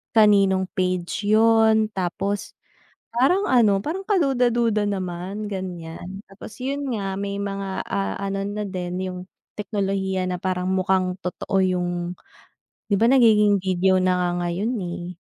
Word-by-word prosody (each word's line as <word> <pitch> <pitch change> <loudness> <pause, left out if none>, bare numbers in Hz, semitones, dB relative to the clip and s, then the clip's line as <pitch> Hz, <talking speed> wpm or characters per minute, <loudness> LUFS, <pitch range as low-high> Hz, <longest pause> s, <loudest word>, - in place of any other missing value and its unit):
kaninong 200 -3 +5
page 185 +1 -2
yun 220 0 +4
tapos 195 +1 -3 0.6
parang 275 - +3
ano, 210 -5 +4
parang 380 +6 -4
kaduda-duda 240 - +2
naman, 190 +2 -4
ganiyan. 185 +1 -6
Tapos 205 +2 -11
yun 280 +1 -2
nga, 195 -1 -3
may 200 0 -3
mga, 195 -1 -4
ah, 195 0 -2
ano 195 0 -3
na 210 +1 -3
din 180 -3 -4
yung 185 -1 -5 0.4
teknolohiya 195 -2 -1
na 180 - -3
parang 185 0 -1
mukhang 185 -1 +1
totoo 185 +2 -4
yung 180 -1 +1 1.0
'di 200 - +5
ba 230 - +4
nagiging 210 -6 +5
video 185 0 +2
na 185 0 +2
nga 180 -1 +1
ngayon 190 +8 -1
eh. 175 0 -6
195 Hz, 135 wpm, -23 LUFS, 185-215 Hz, 1.0 s, kaninong